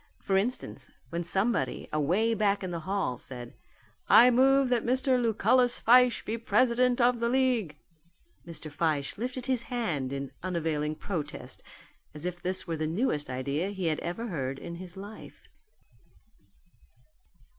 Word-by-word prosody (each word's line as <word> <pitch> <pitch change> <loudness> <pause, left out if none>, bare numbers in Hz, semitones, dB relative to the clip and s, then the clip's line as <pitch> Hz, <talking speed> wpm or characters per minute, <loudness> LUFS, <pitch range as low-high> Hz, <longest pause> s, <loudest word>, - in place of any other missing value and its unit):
For 195 - -1
instance 225 +7 -2 0.2
when 170 +1 -2
somebody 195 +7 0
away 180 +10 +2
back 205 -2 +1
in 185 - -4
the 170 - -3
hall 190 - -1
said, 120 -2 -8 0.6
"I 245 +2 +8
move 270 +2 +4
that 245 -2 +1
Mr. 255 +1 +2
Lucullus 245 +2 +3
Fyshe 245 0 +5
be 230 +2 -3
president 245 +3 +2
of 245 0 +3
the 235 0 +1
league," 245 - +1 0.7
Mr. 165 -2 -8
Fyshe 145 +1 -1
lifted 250 +1 -4
his 255 -3 0
hand 190 - -2
in 140 0 -4
unavailing 160 -4 -2
protest 160 -2 -6 0.5
as 150 +2 -8
if 180 -1 -4
this 185 +1 0
were 165 -2 -3
the 155 0 -1
newest 160 - -1
idea 140 +8 -2
he 190 -3 -4
had 155 -2 0
ever 175 +7 -4
heard 135 -6 -3
in 170 +4 -7
his 180 +1 -9
life. 205 +3 -10
195 Hz, 145 wpm, -29 LUFS, 160-240 Hz, 0.7 s, I